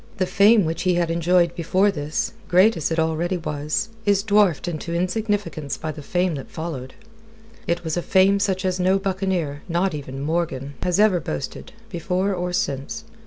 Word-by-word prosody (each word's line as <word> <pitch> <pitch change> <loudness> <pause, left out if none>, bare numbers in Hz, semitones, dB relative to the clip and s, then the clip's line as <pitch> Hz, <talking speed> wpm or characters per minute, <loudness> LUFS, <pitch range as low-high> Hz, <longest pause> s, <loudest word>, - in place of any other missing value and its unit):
The 185 - +1
fame 205 +2 +5
which 160 +1 -2
he 180 -1 +2
had 170 -1 +1
enjoyed 170 +1 +2
before 185 +4 +2
this, 150 -3 -3
great 190 +5 +5
as 160 - -1
it 165 - -2
already 160 +3 0
was, 150 +5 -2
is 200 -2 +2
dwarfed 205 -7 +3
into 170 0 -4
insignificance 185 -4 -2
by 155 0 -4
the 155 - -9
fame 180 +4 0
that 135 -3 -7
followed. 145 -6 -6 0.7
It 170 0 -1
was 160 0 -2
a - - +1
fame 190 +3 +4
such 190 -1 0
as 185 0 0
no 185 +2 +3
buccaneer 185 -7 -2
not 175 +2 +1
even 135 -2 -6
Morgan 145 -3 -2
has 180 +1 0
ever 210 -4 +4
boasted, 160 - -6 0.2
before 185 +2 -1
or 180 -1 -2
since. 175 +7 -2
175 Hz, 175 wpm, -23 LUFS, 160-190 Hz, 0.7 s, fame